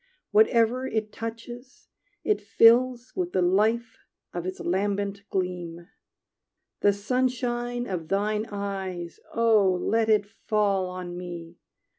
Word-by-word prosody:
Whatever 255 - +3
it 215 -2 -2
touches 240 +3 -8 0.4
it 425 - +1
fills 245 +1 +4
With 360 -1 -2
the 185 - +2
life 220 +6 +1 0.3
of 175 0 -4
its 185 - -5
lambent 200 +2 -1
gleam. 175 -2 -3 0.9
The 205 - +4
sunshine 245 +2 -1
of 175 -6 -4
thine 210 +3 0
eyes, 190 -4 -4
Oh 225 -4 +4
let 225 +3 +1
it 210 -2 +4
fall 205 -3 0
on 180 -1 -6
me! 175 -1 -8
210 Hz, 115 wpm, -26 LUFS, 185-235 Hz, 0.9 s, fills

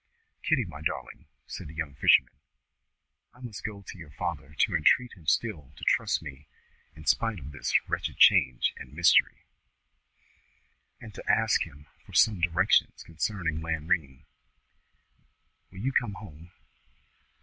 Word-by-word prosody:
"Kitty, 140 -8 +1
my 80 -4 -10
darling," 80 - -5 0.2
said - - -8
the 75 - -11
young 80 -3 -4
fisherman, 65 -2 +4 1.0
"I - - -19
must 120 -5 -8
go 100 -2 -6
to 95 - -10
your 80 -3 -11
father 70 +1 -5
to - - +2
entreat 125 -1 +3
him 85 -5 -17
still 85 - -1
to - - -14
trust - - +1
me 75 -1 -10 0.5
in 80 - -13
spite 115 +3 +1
of 70 0 -9
this 70 - -4 0.2
wretched - - -3
change 65 -2 +5
and - - -11
mystery, - - +3 1.6
and 110 -3 -11
to - - -1
ask 110 -1 +2
him 75 -2 -16 0.2
for - - -17
some 105 -6 +4
directions 85 0 +2
concerning 85 -2 -3
Lanrean. 80 -4 -2 1.5
Will 95 - -16
you 135 +4 0
come 120 -6 0
home? 85 -4 -12
85 Hz, 140 wpm, -28 LUFS, 75-105 Hz, 1.6 s, change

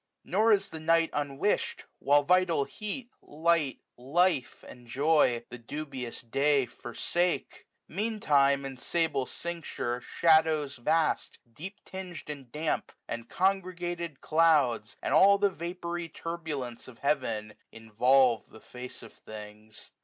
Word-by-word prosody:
Nor 215 +5 +3
is 200 -2 +2
the 160 - -6
night 165 +1 +3
unwish'd 145 +6 -1
j - - -19
while 145 +1 +4
vital 180 -2 +3
heat. 225 - -6
Light, 160 -2 0 0.2
life, 140 +2 +1
and 120 -1 -13
joy, 135 -3 +2
the 125 - -7
dubious 130 -1 -6
day 140 +3 +2
forsake. 170 +10 -2 0.2
Mean 215 +4 -2
time, 140 -4 +3
in 135 -1 -6
sable 150 -3 0
cincture, 165 -8 -4
shadows 155 -3 +3
vast, 155 +5 +1 0.2
Deep 190 - -9
ting'd 180 -5 -7
and 135 -5 -10
damp, 155 +1 -2 0.2
and 115 0 -5
congregated 175 -4 -1
clouds, 150 -9 +3
^5 - - -36
And - - 0
all 195 +6 +7
the 200 0 +2
vapoury 170 0 -5
turbulence 155 -8 -5
of 125 -3 -12
heaven. 115 -7 -1 0.2
Involve 115 +2 +3
the 110 - -14
face 125 +1 -9
of 115 - -12
things. 105 0 -11
150 Hz, 130 wpm, -29 LUFS, 125-170 Hz, 0.2 s, all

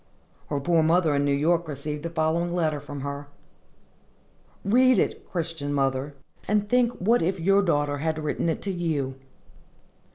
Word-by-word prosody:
Her 145 - -1
poor 165 +3 +2
mother 160 0 +3
in 140 0 +1
New 140 - +1
York 165 +3 +1
received 150 +1 -5
the 170 - -4
following 165 +2 0
letter 155 -4 0
from 145 0 -8
her. 140 +1 -5 1.4
Read 255 +4 +5
it, - - -1
Christian 165 -4 -3
mother, 135 0 -1 0.3
and 210 0 +1
think 245 +1 +2
what 230 +5 +2
if 185 +3 0
your 195 +4 +4
daughter 145 -5 0
had 160 +1 -1
written 155 +2 -1
it 160 - -2
to 200 - -2
you! 160 -7 -2
160 Hz, 160 wpm, -25 LUFS, 145-180 Hz, 1.4 s, Read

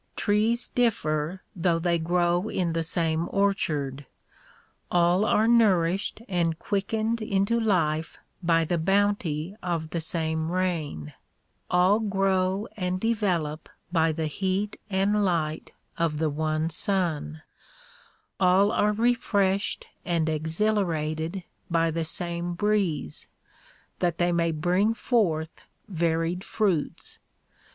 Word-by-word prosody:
Trees 220 +3 +2
differ 175 -7 0
though 170 -1 +1
they 170 0 +1
grow 175 +3 +1
in 175 -3 -1
the 165 - 0
same 165 0 0
orchard. 150 -9 0 0.8
All 175 +3 +3
are 220 0 +3
nourished 200 -3 +2
and 170 -4 0
quickened 220 +4 -1
into 205 +2 +1
life 160 -7 0 0.2
by 165 -2 +2
the 170 +1 0
bounty 195 -2 0
of 165 -3 -3
the 170 - -2
same 160 0 -1
rain; 165 - -2 0.6
all 185 +4 +4
grow 195 -1 0
and 180 -2 -2
develop 180 -9 -1 0.2
by 165 -2 +3
the 160 0 -2
heat 190 +6 -2
and 200 +2 +2
light 160 -4 -1 0.3
of 165 -3 0
the 155 -1 0
one 155 +2 -1
sun; 160 -4 -1 1.0
all 190 +2 +4
are 210 -2 +2
refreshed 205 -4 +1 0.2
and 165 -2 0
exhilarated 160 0 -1 0.3
by 165 -1 +2
the 165 +1 -1
same 175 +1 -3
breeze; 185 - 0 0.7
that 175 -2 0
they 175 0 +2
may 170 -1 +1
bring 180 +8 +1
forth 165 -11 0 0.3
varied 170 0 -1
fruits. 190 -9 -2
175 Hz, 110 wpm, -26 LUFS, 160-200 Hz, 1.0 s, all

